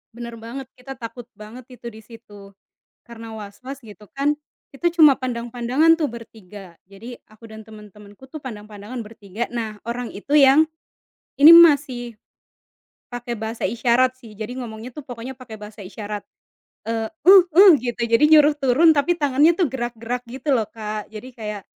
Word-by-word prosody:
Benar 235 Hz, -1 st, -8 dB
banget, 245 Hz, +3 st, -8 dB
kita 270 Hz, +2 st, -10 dB
takut 240 Hz, 0 st, -9 dB
banget 225 Hz, +4 st, -12 dB
itu 240 Hz, -, -11 dB
di 220 Hz, 0 st, -14 dB
situ. 220 Hz, -2 st, -15 dB, 0.7 s
Karena 225 Hz, -1 st, -10 dB
waswas 220 Hz, +6 st, -10 dB
gitu 210 Hz, -1 st, -14 dB
kan, 285 Hz, +2 st, 0 dB, 0.4 s
kita 340 Hz, +5 st, -1 dB
cuma 305 Hz, -5 st, +7 dB
pandang-pandangan 245 Hz, +5 st, +1 dB
tuh 300 Hz, -, 0 dB
bertiga. 205 Hz, -5 st, -12 dB
Jadi 225 Hz, +5 st, -11 dB
aku 215 Hz, +1 st, -16 dB
dan 220 Hz, 0 st, -11 dB
teman-temanku 210 Hz, +2 st, -15 dB
tuh, 310 Hz, -, -7 dB
pandang-pandangan 210 Hz, 0 st, -9 dB
bertiga. 215 Hz, 0 st, -7 dB
Nah 220 Hz, -3 st, -5 dB
orang 240 Hz, 0 st, -4 dB
itu 275 Hz, +9 st, -2 dB
yang 290 Hz, +2 st, +6 dB, 0.7 s
ini 300 Hz, +4 st, +10 dB
masih 280 Hz, -8 st, +4 dB, 1.0 s
pakai 240 Hz, 0 st, -5 dB
bahasa 220 Hz, +1 st, -6 dB
isyarat 240 Hz, +4 st, +1 dB
sih, 220 Hz, -4 st, -14 dB
jadi 225 Hz, +4 st, -7 dB
ngomongnya 230 Hz, 0 st, -8 dB
tuh 300 Hz, -, -10 dB
pokoknya 245 Hz, +2 st, -8 dB
pakai 240 Hz, -4 st, -10 dB
bahasa 210 Hz, +1 st, -12 dB
isyarat. 205 Hz, +2 st, -7 dB, 0.6 s
Eee, 225 Hz, -1 st, -2 dB, 0.2 s
"uh 380 Hz, -1 st, +9 dB
uh" 385 Hz, +5 st, +8 dB
gitu, 240 Hz, -2 st, -5 dB
jadi 230 Hz, +5 st, +2 dB
nyuruh 300 Hz, -1 st, +6 dB
turun 290 Hz, +4 st, +4 dB
tapi 310 Hz, +5 st, +1 dB
tangannya 290 Hz, +3 st, +3 dB
tuh 360 Hz, -, +2 dB
gerak-gerak 240 Hz, -1 st, -5 dB
gitu 270 Hz, +3 st, -2 dB
loh 225 Hz, -5 st, 0 dB
Kak, 215 Hz, -1 st, -7 dB
jadi 215 Hz, +3 st, -10 dB
kayak 210 Hz, -3 st, -7 dB
235 Hz, 155 wpm, -21 LUFS, 220-265 Hz, 1.0 s, ini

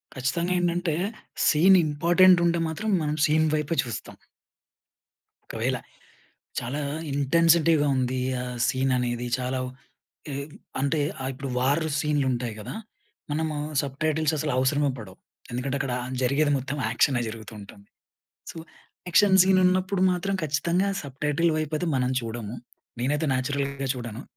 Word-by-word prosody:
ఖచ్చితంగా 170 Hz, +8 st, -1 dB
ఏంటంటే 175 Hz, -2 st, 0 dB, 0.5 s
scene 185 Hz, +5 st, +6 dB
important 175 Hz, +4 st, +5 dB
ఉంటే 170 Hz, 0 st, +2 dB
మాత్రం 210 Hz, +7 st, -3 dB
మనం 150 Hz, 0 st, -1 dB
సీన్ 155 Hz, +1 st, +3 dB
వైపే 150 Hz, +2 st, -1 dB
చూస్తాం. 115 Hz, -4 st, -7 dB, 1.3 s
ఒకవేళ -, -, -1 dB, 0.8 s
చాలా 135 Hz, +5 st, -4 dB, 0.3 s
ఇంటెన్సిటీ‌గా 160 Hz, +2 st, +3 dB
ఉంది 130 Hz, 0 st, 0 dB, 0.2 s
ఆ -, -, -4 dB, 0.2 s
సీన్ 130 Hz, 0 st, 0 dB
అనేది 120 Hz, 0 st, -2 dB
చాలా 130 Hz, +1 st, -2 dB
ఉ -, -, -5 dB, 1.1 s
అంటే 140 Hz, +3 st, +1 dB, 0.2 s
ఆహ్, 130 Hz, -, -2 dB
ఇప్పుడు 135 Hz, +1 st, -6 dB
వార్ 140 Hz, +6 st, +2 dB, 0.2 s
సీన్‌లుంటాయి 130 Hz, -6 st, 0 dB
గదా! 105 Hz, -, -7 dB, 0.6 s
మనము 155 Hz, +1 st, -1 dB, 0.3 s
సబ్‌టైటిల్స్ 155 Hz, +2 st, 0 dB
అసలు 150 Hz, -1 st, -1 dB
అవసరమే 140 Hz, +2 st, +2 dB
పడవు. 95 Hz, -4 st, -10 dB, 0.3 s
ఎందుకంటే 130 Hz, +3 st, -2 dB
అక్కడ 135 Hz, -2 st, -2 dB, 0.3 s
జరిగేది 145 Hz, +4 st, +2 dB
మొత్తం 135 Hz, +3 st, -4 dB
యాక్షనే 120 Hz, +2 st, +2 dB
జరుగుతూ 110 Hz, -1 st, -8 dB
ఉంటుంది. 100 Hz, 0 st, -14 dB, 0.6 s
సో -, -, -12 dB, 0.5 s
యాక్షన్ 190 Hz, +2 st, +5 dB
సీన్ 190 Hz, 0 st, +4 dB
ఉన్నప్పుడు 185 Hz, +1 st, +2 dB
మాత్రం 195 Hz, +2 st, -1 dB
ఖచ్చితంగా 170 Hz, +6 st, +1 dB
సబ్‌టైటిల్ 150 Hz, +4 st, 0 dB
వైపు 155 Hz, 0 st, -2 dB
అయితే 175 Hz, -, -2 dB
మనం 125 Hz, 0 st, +1 dB
చూడము. 115 Hz, -1 st, -6 dB, 0.5 s
నేనైతే 145 Hz, +5 st, 0 dB
నేచురల్‌గా 140 Hz, +1 st, -2 dB
చూడను. 120 Hz, -1 st, -6 dB
145 Hz, 125 wpm, -26 LUFS, 130-165 Hz, 1.3 s, సీన్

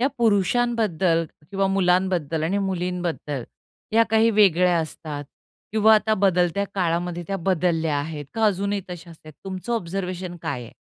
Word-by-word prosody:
या 255 Hz, -, +3 dB
पुरुषांबद्दल 205 Hz, -5 st, +2 dB, 0.3 s
किंवा 195 Hz, -1 st, +1 dB
मुलांबद्दल 180 Hz, -4 st, +1 dB
आणि 195 Hz, +5 st, 0 dB
मुलींबद्दल, 180 Hz, -7 st, -3 dB, 0.5 s
या 230 Hz, +1 st, +6 dB
काही 225 Hz, +1 st, +4 dB
वेगळ्या 180 Hz, -4 st, +4 dB
असतात. 155 Hz, -2 st, -5 dB, 0.5 s
किंवा 220 Hz, 0 st, +6 dB
आता 215 Hz, 0 st, +2 dB
बदलत्या 185 Hz, -1 st, +2 dB
काळामध्ये 175 Hz, -1 st, -1 dB
त्या 195 Hz, -, -1 dB
बदलल्या 165 Hz, -4 st, 0 dB
आहेत, 145 Hz, 0 st, -4 dB
का 225 Hz, -, +1 dB
अजूनही 200 Hz, 0 st, 0 dB
तश्याचं 170 Hz, -2 st, -9 dB
आहे, 155 Hz, -, -11 dB
तुमचं 190 Hz, +4 st, -5 dB
ऑब्झर्वेशन 185 Hz, -3 st, -3 dB
काय 125 Hz, -, -3 dB
आहे? 115 Hz, -, -12 dB
180 Hz, 140 wpm, -23 LUFS, 165-200 Hz, 0.5 s, या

